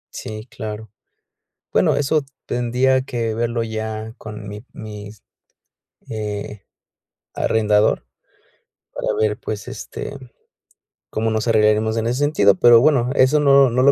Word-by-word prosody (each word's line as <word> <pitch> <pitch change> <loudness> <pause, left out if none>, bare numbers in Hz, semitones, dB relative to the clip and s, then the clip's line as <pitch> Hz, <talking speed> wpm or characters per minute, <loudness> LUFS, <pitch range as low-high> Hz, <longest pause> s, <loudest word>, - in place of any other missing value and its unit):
Sí, 110 0 -7
claro. 110 -3 -7 0.8
Bueno, - - +3
eso 145 +1 +1 0.2
tendría 125 +2 +1
que 115 -4 -3
verlo 115 +1 -1
ya 110 0 -5
con 105 -1 -8
mi 105 +1 -8
mis, 105 -1 -10 0.9
eh, 105 -2 -5 0.7
arrendador, 105 -1 +2 0.9
para - - -5
ver, 105 -1 +1
pues, 105 -2 -5
este, - - -7 1.0
cómo 110 +1 -1
nos 110 +1 -1
arreglaremos 110 0 +3
en 115 - 0
ese 120 +3 -1
sentido, 145 -9 +4
pero 115 +5 +7
bueno, 130 -2 +3
eso 130 +4 +4
no 140 -3 +5
no 125 - +2
lo 140 +2 +6
110 Hz, 125 wpm, -20 LUFS, 105-125 Hz, 1.0 s, pero